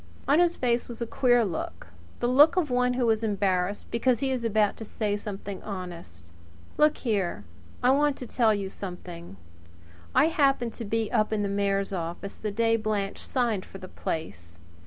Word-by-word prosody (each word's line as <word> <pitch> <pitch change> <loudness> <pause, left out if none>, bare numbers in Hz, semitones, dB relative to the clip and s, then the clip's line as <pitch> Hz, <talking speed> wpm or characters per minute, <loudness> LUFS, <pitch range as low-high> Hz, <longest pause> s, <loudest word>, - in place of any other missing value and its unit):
On 290 +4 +5
his 345 -1 +3
face 240 -1 0
was 235 - -7
a 235 - -1
queer 245 0 +3
look 160 - -5 0.3
the 240 - +2
look 285 +7 +6
of 330 -7 +1
one 250 0 +2
who 245 -1 +1
is 220 0 0
embarrassed 195 -2 0
because 235 0 +2
he 270 0 0
is 255 -2 -2
about 215 -2 +2
to - - -7
say 210 -1 -2
something 200 -1 -6
honest. 170 - -8 0.4
"Look 300 0 +4
here! 200 - -1 0.4
I 250 - +5
want 290 +1 +2
to 255 - -7
tell 235 -2 +2
you 200 -2 -1
something: 175 - -8 0.8
I - - +6
happened 275 -7 +2
to 230 - -6
be 225 +1 -1
up 215 0 +2
in 210 -1 0
the - - 0
mayor's 200 0 0
office 175 +2 -5
the 215 - -2
day 225 +2 +2
Blanche 210 -2 -2
signed 235 -7 -1
for 195 - -11
the 185 -1 -9
place. 85 - -5
215 Hz, 185 wpm, -27 LUFS, 195-245 Hz, 0.8 s, look